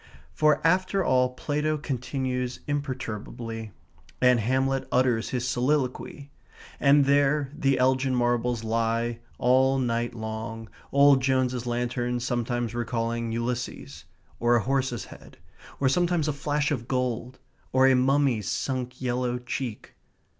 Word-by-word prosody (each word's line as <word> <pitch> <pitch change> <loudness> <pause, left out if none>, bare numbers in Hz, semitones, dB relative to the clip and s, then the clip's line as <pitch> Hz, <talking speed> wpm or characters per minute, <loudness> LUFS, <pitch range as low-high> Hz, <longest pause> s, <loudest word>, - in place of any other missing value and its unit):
For 150 0 +2
after 185 +3 +2
all 125 -1 +3
Plato 150 +3 -1
continues 130 -2 -3
imperturbably. 115 -5 -4 0.5
And 125 -1 +5
Hamlet 130 +4 0
utters 125 -3 +2
his 125 -1 -2
soliloquy. 130 +2 -1 0.5
And 140 0 +5
there 140 0 +2
the 135 -2 +1
Elgin 130 +1 +2
Marbles 120 -1 0
lie, 115 +1 0 0.2
all 130 +2 +3
night 120 -2 -1
long, 110 0 -6 0.2
old 140 -1 +6
Jones's 130 -2 0
lantern 120 0 -1
sometimes 120 -1 -2
recalling 115 -1 -2
Ulysses, 120 +2 -4 0.3
or 120 0 +3
a 115 - +2
horse's 135 -2 -1
head; - - -14 0.4
or 140 - +2
sometimes 170 +2 +1
a 150 - 0
flash 145 +1 -1
of 120 -5 -2
gold, 125 -1 -2 0.3
or 130 0 +4
a 135 - +6
mummy's 130 -5 +2
sunk 125 -2 -3
yellow 125 0 -1
cheek. 125 -2 -5
125 Hz, 125 wpm, -26 LUFS, 120-135 Hz, 0.5 s, old